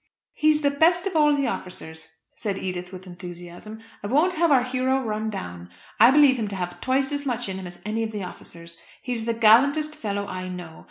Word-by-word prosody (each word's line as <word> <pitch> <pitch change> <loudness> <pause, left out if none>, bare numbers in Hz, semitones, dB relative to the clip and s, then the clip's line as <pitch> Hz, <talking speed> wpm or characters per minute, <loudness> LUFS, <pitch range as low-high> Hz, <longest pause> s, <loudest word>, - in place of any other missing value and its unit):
"He's 305 0 +2
the 285 - +3
best 340 +5 +3
of 385 -3 -3
all 295 -1 +5
the 280 -1 0
officers," 180 -8 -5 0.3
said 200 -3 -4
Edith 180 -1 -5
with 185 0 -10
enthusiasm. 175 +4 -10 0.2
"I 205 - -4
won't 310 - +3
have 335 -1 +2
our 260 -3 +5
hero 255 +1 0
run 215 -1 -2
down. 90 - -7 0.3
I - - +9
believe 275 -2 +5
him 215 - -1
to 200 - -5
have 180 -1 -5
twice 265 +1 +1
as 285 -1 -3
much 245 -2 -1
in 190 -1 -4
him 185 - -7
as 175 0 -11
any 215 +2 -1
of 225 -1 -2
the 210 -3 -4
officers. 170 -2 -10 0.2
He's 240 -3 -3
the 230 - 0
gallantest 280 +8 +4
fellow 205 -7 -3
I 185 -1 -5
know. 175 -3 -8
220 Hz, 215 wpm, -24 LUFS, 185-280 Hz, 0.3 s, I